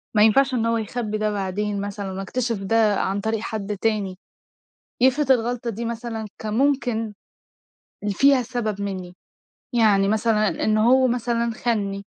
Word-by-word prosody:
ما 210 - +6
ينفَعش 265 +5 +4
إن 230 -2 +1
هو 230 0 +1
يخبّي 220 -1 -3
ده 215 0 0
بعدين 200 +1 -2
مثلًا 200 -1 -5
وأكتشف 225 +5 -2
ده 220 0 +3
عن 195 +1 -1
طريق 220 0 -1
حد 210 -2 -4
تاني، 205 -4 0 0.8
يفرِض 265 +2 +4
الغلطة 240 -1 -1
دي 230 +2 -5
مثلًا 230 -1 -4 0.2
كان 215 -1 -3
ممكن 245 -4 +1 0.9
اللي 205 - -1
فيها 275 +4 +4
سَبب 220 -4 -3
منّي، 185 -3 -5 0.6
يعني 210 -4 +4
مثلًا 215 0 +2 0.2
إن 215 0 +2
هو 255 +4 +5
مثلًا 235 -1 0
خانني 200 -4 -2
220 Hz, 150 wpm, -23 LUFS, 205-240 Hz, 0.9 s, ما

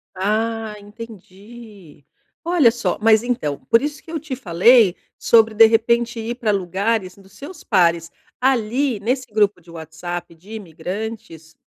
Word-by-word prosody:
Ah, 220 +3 -2
entendi, 205 - -14 0.4
olha 335 -9 +4
só. 215 -7 -3
Mas 220 +1 +4
então, 190 - -2
por 230 - +3
isso 295 0 -5
que 325 - -12
eu 325 - -3
te 280 -3 -6
falei 205 -1 +4 0.2
sobre, 225 -2 +3
de 225 - +8
repente, 235 +1 +1
ir 230 +2 -4
pra 230 -4 -1
lugares 195 +1 -2
dos 195 -1 -19
seus 340 +6 -11
pares. 170 -4 +1 0.3
Ali, 250 -1 0
nesse 255 +5 -2
grupo 205 -3 +2
de 170 0 -18
WhatsApp 170 +1 -7
de 185 +6 -17
imigrantes, 190 -3 -7
220 Hz, 145 wpm, -20 LUFS, 185-235 Hz, 0.4 s, de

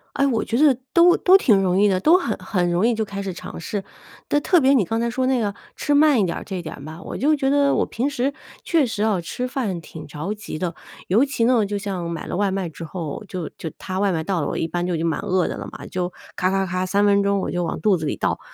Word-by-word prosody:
哎， 275 - +2
我 235 -5 0
觉 230 - -1
得 280 -4 +5 0.2
都 350 +1 +6
都 375 +1 +6
挺 210 - +4
容 185 -1 +1
易 205 - +5
的， 185 -1 +1
都 325 - +5
很 235 - -2
很 185 -2 -1
容 180 +7 +2
易 240 - +2
就 220 - 0
开 200 -1 -5
始 190 -2 -4
尝 - - -8
试， 195 +4 -4 0.5
但 290 - +2
特 355 -5 +4
别 265 +1 +4
你 220 -9 +3
刚 225 +4 -1
才 235 - 0
说 255 +2 -1
那 260 -3 +2
个 205 -2 -1 0.2
吃 290 - 0
慢 295 -2 +5
一 - - +3
点 170 - -2
儿 - - -6
这 190 -3 -4
点 150 -3 -8
吧， 160 +2 -9
我 - - -6
就 300 +3 +3
觉 270 -1 0
得 280 0 +3
我 - - +2
平 260 +5 -2
时， 275 +1 -1 0.3
确 320 -5 +2
实 220 -3 -2
哦， 210 -5 +2
吃 245 +9 -4
饭 230 - -3
挺 155 -1 -10
着 155 +8 -4
急 210 -7 -7
的。 175 0 -2 0.4
尤 225 +9 +4
其 275 -4 -1
呢， 235 -3 +4
就 205 +1 -3
像 190 -4 -4
买 165 -2 -5
了 - - -3
外 200 -1 +2
卖 190 -3 -2
之 165 +1 -8
后， 165 +3 -6
就 180 -5 -5
就 160 - -5
它 185 +1 -4
外 200 -2 +2
卖 160 -1 -1
到 185 0 -1
了， 145 - -1
我 - - -3
一 165 - -1
般 175 +1 -2
就 175 - 0
已 - - -1
经 165 - -1
蛮 160 - 0
饿 185 -3 0
的 - - -4
了 - - -6
嘛， - - -10
就 180 -1 -2 0.3
咔 185 +1 +2
咔 195 0 +1
咔， 185 0 -2
3 200 +2 +1
分 200 0 +4
钟 200 -1 +1
我 - - -3
就 175 -1 -1
往 - - -4
肚 205 -4 +3
子 155 - -4
里 - - -1
倒。 - - -1
200 Hz, 310 characters per minute, -22 LUFS, 180-250 Hz, 0.5 s, 都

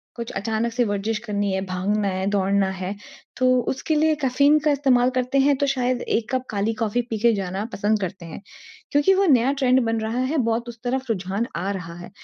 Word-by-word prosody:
कुछ 235 -1 -6
अचानक 220 +3 -2
से 245 0 +2
वर्जिश 210 +2 -2
करनी 205 -3 -2
है, 190 - -1
भागना 200 +3 -1
है, 190 0 -2
दौड़ना 195 -1 +1
है 190 +1 -5 0.4
तो 255 - +1 0.2
उसके 305 +4 -1
लिए 310 0 +3
कैफ़ीन 280 +3 +4
का 300 - +4
इस्तेमाल 260 -3 +3
करते 255 +1 -1
हैं। 280 +1 +4
तो 280 - +1
शायद 255 -2 0
एक 225 0 -1
कप 255 0 0
काली 215 +2 -1
कॉफ़ी 225 +2 +1
पी 220 - -2
के 235 +1 +4
जाना 195 0 -3
पसंद 210 +1 +1
करते 185 -1 -5
हैं। 165 - -9 0.5
क्योंकि 290 +7 +4
वो 390 +1 +3
नया 265 -4 +4
ट्रेंड 260 -1 +3
बन 225 0 0
रहा 225 +3 -2
है, 300 +5 -1
बहुत 235 -1 0
उस 235 - -9
तरफ 260 +2 -1
रुझान 200 +3 -2
आ 190 +4 -2
रहा 170 -3 -6
है। 175 - -9
225 Hz, 215 wpm, -23 LUFS, 200-255 Hz, 0.5 s, कैफ़ीन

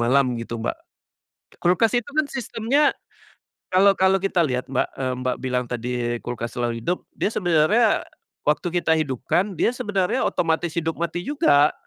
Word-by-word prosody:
malam 130 +2 +3
gitu 115 0 -5
Mbak. - - -1 0.8
Kulkas 210 +7 +2
itu 240 +2 -3
kan 305 -1 +1
sistemnya, 265 +3 +1 0.8
kalau 195 +1 +5
kalau 190 0 +3
kita 185 -3 +2
lihat 125 -2 -3
Mbak, 130 - 0
eee, 130 -1 0
Mbak 130 0 -1
bilang 125 -1 -1
tadi 120 0 -3
kulkas 120 -1 -5
selalu 120 -1 -2
hidup. 180 +1 -2
Dia 210 - 0
sebenarnya, 180 +6 +3 0.4
waktu 150 +4 +1
kita 175 -1 +1
hidupkan, 160 - -1
dia 240 - +2
sebenarnya 195 -6 -1
otomatis 165 0 0
hidup 165 -1 0
mati 170 +2 -3
juga. 155 - +3
165 Hz, 150 wpm, -23 LUFS, 130-195 Hz, 0.8 s, kalau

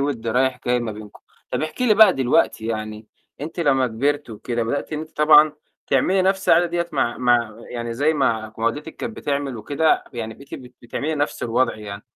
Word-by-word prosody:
وِد 135 -5 -2
رايح 130 +3 +1
جاي 125 0 +2
ما 115 -2 -4
بينكم. 105 -1 -12 0.3
طَب - - -2
احكي 205 +11 -2
لي 215 - +5
بقى 210 -3 +7
دلوقتي 125 -3 +1
يعني 110 -1 -5 0.3
أنتِ 160 +4 -5
لمّا 135 -5 +3
كبِرتِ 140 +3 -1
وكده 115 +2 -3
بدأتِ 140 +7 -3
إن 155 - -2
أنتِ 155 0 -11
طبعًا 150 0 +6 0.3
تعملي 190 0 +2
نَفْس 190 +1 0
العادة 175 - +5
ديّة 170 0 -2
مع 120 -5 0
مع 120 -3 +2
يعني 120 -1 -4
زي 150 +5 +1
ما 110 -6 0
ما 115 - -3
والدتِك 145 +7 -3
كانت 230 -2 -6
بتعمل 140 -3 -2
وكده، 145 +7 +1
يعني 110 -2 -5
بقيتِ 140 +3 -11
بت 125 -1 -11
بتعملي 145 +6 -3
نَفْس 145 0 -2
الوضع 120 +3 +1
يعني. 105 -1 -8
130 Hz, 195 wpm, -22 LUFS, 115-155 Hz, 0.3 s, بقى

